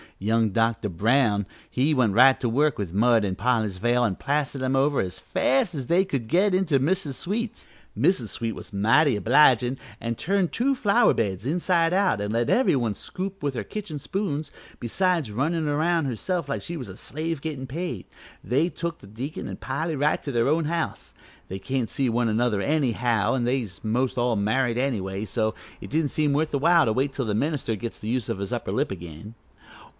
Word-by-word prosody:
Young 110 +2 +1
Dr. 115 0 0
Brown 105 +2 +2 0.3
went 130 -6 +3
right 130 +4 +6
to 120 - -1
work 145 +6 +2
with 95 -5 -4
mud 115 +1 +3
an' 95 -2 -2
Polly's 110 -6 0
veil 120 +5 +2
an' 105 -6 +1
plastered 140 +1 -2
'em 130 +1 0
over 140 +1 +2
as 90 -1 -2
fast 270 -9 +1
as 135 -5 -5
they 180 +3 +3
could 135 -11 -3
get 190 - +3
into 170 -7 +2
Mrs. 160 +1 0
Sweet's. 215 - -3 0.3
Mrs. 130 - +2
Sweet 115 -1 -3
was - - -9
mighty 115 +7 +3
obligin' 125 +2 +4 0.2
an' 115 0 -2
turned 190 - 0
two 270 +4 +1
flower 235 0 +3
beds 100 -2 -2
inside 170 +1 +2
out 185 - +2
an' 105 0 -2
let 115 +1 0
every 255 - +3
one 120 -5 0
scoop 195 +1 -6
with 140 -2 0
her - - -2
kitchen 205 -8 -6
spoons, 155 -2 -3 0.3
besides 165 - 0
runnin' 155 +8 -1
aroun' 160 +2 +1
herself 150 - -2
like 140 - -2
she 170 - -4
was 125 -8 -7
a 95 - -9
slave 155 +1 -3
gettin' 140 -4 -5
paid. 170 +7 -4 0.4
They 140 - +1
took 170 -1 -5
the - - -14
deacon 125 +9 -6
an' 95 - -6
Polly 140 +8 -3
right 145 +2 +1
to 140 - -4
their 120 -1 +1
own 155 +2 +2
house. 165 +1 -3 0.3
They 95 - -6
can't 130 +1 -2
see 135 -3 0
one 120 +1 +1
another 110 -2 +1
anyhow, 125 -6 +1
an' 125 - 0
they 130 +2 +1
was 95 -7 -9
most 125 +3 0
all 120 -1 +1
married 115 +4 +1
anyway, 105 -6 -2
so 110 0 -1 0.3
it - - -9
didn't 155 0 +1
seem 150 -1 +1
worth 155 +2 0
while 160 +3 +4
to 110 - +1
wait 135 +4 0
till 135 -1 -2
the 105 -2 -1
minister 140 -2 -1
gets 115 +3 -6
the 105 - -7
use 125 -2 -1
of - - -2
his 100 -1 -3
upper - - -3
lip - - 0
again." 85 +3 -8
130 Hz, 200 wpm, -25 LUFS, 115-160 Hz, 0.4 s, right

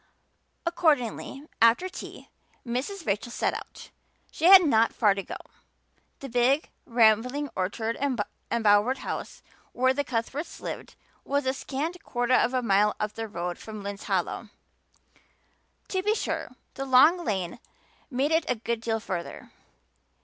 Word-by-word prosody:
Accordingly 290 -6 0 0.2
after 230 +11 +5
tea 370 - -10 0.3
Mrs. 280 +10 -3
Rachel 205 +4 -1
set - - 0
out; - - -9 0.4
she 320 - -2
had 375 0 +10
not 230 -5 +3
far 210 -4 +4
to 195 - -3
go; - - -7 0.9
the 275 - -5
big, 250 +4 +2 0.2
rambling, 245 +4 +3
orchard 220 +5 -2 0.5
embowered 220 +2 +3
house - - -6 0.3
where 260 +1 +3
the 285 +2 -1
Cuthberts 260 +5 -4
lived - - -7 0.3
was 280 0 -1
a 260 - +1
scant 305 +6 -4
quarter 245 0 0
of 245 - +4
a 255 - +1
mile 210 -1 +3
up 210 0 -2
the 225 0 -5
road 175 -3 -4
from 215 -2 -8
Lynde's 200 0 -6
Hollow. - - -2 1.4
To 375 - 0
be 420 +3 +1
sure, - - -3 0.2
the 270 - -4
long 295 +7 +6
lane 190 - -2 0.5
made 275 +3 0
it 320 0 +1
a - - +2
good 230 0 -3
deal 225 -1 -1
further. 180 -5 -6
245 Hz, 140 wpm, -27 LUFS, 220-285 Hz, 1.4 s, had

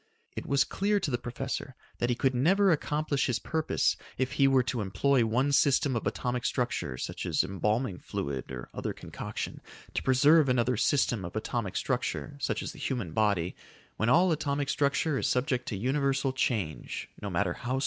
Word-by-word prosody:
It - - -5
was 140 -1 +4
clear 205 +1 0
to 145 - -2
the 120 - 0
professor 130 +2 -4 0.2
that 120 - +1
he 120 - +2
could 135 +1 +1
never 185 +10 +4
accomplish 150 -2 0
his 125 -3 +1
purpose 160 +7 0 0.2
if 130 0 0
he 140 - +4
were 135 -2 +4
to 125 -1 -2
employ 115 +7 +2
one 130 +6 +1
system 140 -1 +3
of 110 - -1
atomic 120 +3 -2
structure, 120 - -1
such - - -4
as - - +2
embalming 105 +1 -1
fluid 70 -2 -4
or - - -6
other - - -3
concoction, - - -6 0.3
to - - -1
preserve 145 +3 +5
another 125 0 +2
system 120 -3 +2
of 85 +3 -7
atomic 110 -2 -2
structure, 130 +3 -2
such - - -1
as - - -4
the - - -13
human 120 - -2
body, 100 -4 +1 0.4
when 110 - +1
all 175 +6 +5
atomic 145 -2 -1
structure 140 +1 +1
is - - 0
subject 125 0 0
to 105 - -3
universal 135 +3 +1
change, 110 - -2
no 100 - -3
matter 90 0 0
how 125 +6 -3
slow. - - 0
125 Hz, 185 wpm, -29 LUFS, 110-140 Hz, 0.4 s, preserve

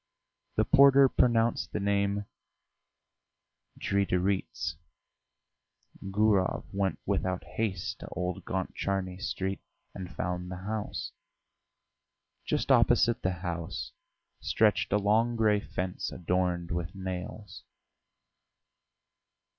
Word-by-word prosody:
The - - +3
porter 140 0 +7
pronounced 120 -2 +2
the - - 0
name 100 0 +1 1.5
"Dridirits." 95 -3 0 1.3
Gurov 100 -2 +2
went 100 -1 0
without 95 -1 -1
haste 95 -5 -3
to - - -8
Old 90 0 -3
Gontcharny 95 0 -2
Street 95 0 -2 0.3
and 95 -2 -6
found 90 +1 -3
the 90 - -5
house. 110 0 -3 1.3
Just - - 0
opposite 120 0 +4
the 95 - +1
house 85 -1 -4 0.5
stretched - - +2
a 105 - +4
long 110 +4 +2
grey 110 -2 +3
fence 90 -2 -4
adorned 90 -1 -1
with 85 +2 -3
nails. 95 +1 -6
95 Hz, 90 wpm, -29 LUFS, 90-105 Hz, 1.5 s, porter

